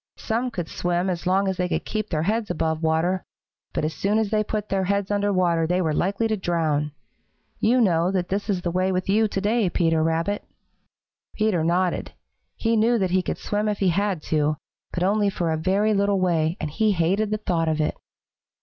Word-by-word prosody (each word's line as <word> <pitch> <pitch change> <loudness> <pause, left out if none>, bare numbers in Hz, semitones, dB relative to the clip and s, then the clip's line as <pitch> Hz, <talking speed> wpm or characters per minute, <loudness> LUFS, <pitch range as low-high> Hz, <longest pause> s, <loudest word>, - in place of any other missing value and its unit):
Some 235 +3 -1
could 175 -8 -4
swim 175 +2 -1
as 175 0 -4
long 195 +2 +2
as 190 -1 -1
they 180 0 -1
could - - -2
keep 215 -1 -3
their 155 -2 0
heads 215 +3 0
above 160 -2 -1
water, 165 +3 +1 0.5
but - - -1
as 155 - -2
soon 205 +2 0
as 220 -2 0
they 215 -1 +2
put 210 0 -4
their 190 -1 0
heads 200 +1 0
under 205 0 +1
water 170 -4 +2
they 180 +2 +1
were 160 -4 0
likely 200 +7 0
to 220 - +1
drown. 160 -6 0 0.7
You 240 +4 +3
know 175 -4 +3
that 185 -1 -1
is 200 -2 -1
the 175 - -1
way 185 +2 +1
with 185 0 -1
you 215 +2 +4
to 200 - -3
day, 210 0 +1
Peter 165 -2 +1
Rabbit." 165 +5 0 0.9
Peter 215 -7 +1
nodded. 175 +2 0 0.4
He 230 0 0
knew 230 +2 +3
that 190 -4 0
he 185 0 +3
could - - -3
swim 210 +1 -2
if 210 - -1
he 195 - +2
had 195 -2 0
to, 150 -1 +1 0.3
but 180 - -2
only 205 +2 +2
for 175 -4 -1
a - - +1
very 195 +6 +1
little 200 -1 +2
way, 170 -2 +1
and 150 - -3
he 215 +5 +2
hated 190 +5 +1
the 215 - 0
thought 170 -6 -1
of 155 0 -1
it. 150 - 0
185 Hz, 215 wpm, -24 LUFS, 170-205 Hz, 0.9 s, you